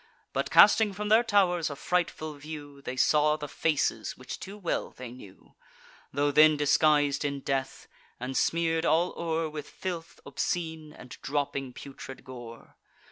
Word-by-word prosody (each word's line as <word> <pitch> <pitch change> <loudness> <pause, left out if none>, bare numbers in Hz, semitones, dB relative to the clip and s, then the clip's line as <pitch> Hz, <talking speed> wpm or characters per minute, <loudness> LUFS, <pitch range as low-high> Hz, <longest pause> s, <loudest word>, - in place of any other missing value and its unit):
But, - - -1
casting 215 -3 +6
from 210 +2 -4
their 220 +2 +6
tow'rs 185 -7 +2
a 145 - -5
frightful 155 -1 -1
view, 145 -1 -9
They 130 - -5
saw 150 +3 +3
the 150 - -6
faces, 140 -7 -1
which 130 - -7
too 195 +2 -8
well 185 -5 -2
they 125 -2 -9
knew, 105 -6 -14 0.6
Tho' 145 +2 +1
then 155 +1 +6
disguis'd 145 -1 +3
in 140 -1 -2
death, 135 -1 -3 0.3
and 130 +2 -4
smear'd 165 +1 +1
all 170 +2 +2
o'er 165 -1 -1
With 150 -1 -7
filth 170 -3 -6
obscene, 160 -3 -3
and 125 - -13
dropping 140 -2 -2
putrid 135 0 -10
gore. 120 -3 -11
150 Hz, 150 wpm, -28 LUFS, 140-165 Hz, 0.6 s, casting